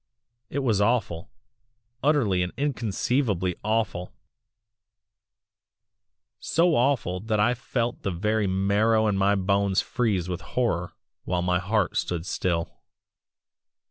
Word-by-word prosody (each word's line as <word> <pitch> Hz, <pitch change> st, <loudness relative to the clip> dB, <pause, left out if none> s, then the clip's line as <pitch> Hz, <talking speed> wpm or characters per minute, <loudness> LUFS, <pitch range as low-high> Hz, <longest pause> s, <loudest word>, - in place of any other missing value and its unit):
"It 140 Hz, 0 st, -2 dB
was 110 Hz, -6 st, +2 dB
awful 105 Hz, -7 st, 0 dB, 0.7 s
utterly 125 Hz, -11 st, +2 dB
and 90 Hz, 0 st, -1 dB
inconceivably 120 Hz, -7 st, 0 dB
AWFUL 110 Hz, -4 st, -1 dB, 2.3 s
so 170 Hz, 0 st, +2 dB
awful 120 Hz, -8 st, +1 dB
that 110 Hz, +1 st, -1 dB
I 120 Hz, +4 st, +3 dB
felt 120 Hz, -1 st, -3 dB
the 100 Hz, -, -2 dB
very 105 Hz, +4 st, 0 dB
marrow 100 Hz, +4 st, +2 dB
in 105 Hz, -2 st, +1 dB
my 100 Hz, +1 st, +3 dB
bones 100 Hz, 0 st, +1 dB
freeze 105 Hz, -8 st, -1 dB
with 90 Hz, +1 st, -4 dB
horror 95 Hz, -6 st, -1 dB, 0.3 s
while 90 Hz, -1 st, -1 dB
my 90 Hz, 0 st, +1 dB
heart 100 Hz, +1 st, 0 dB
stood 85 Hz, -2 st, -2 dB
still. 85 Hz, -3 st, -2 dB
100 Hz, 110 wpm, -26 LUFS, 90-115 Hz, 2.3 s, I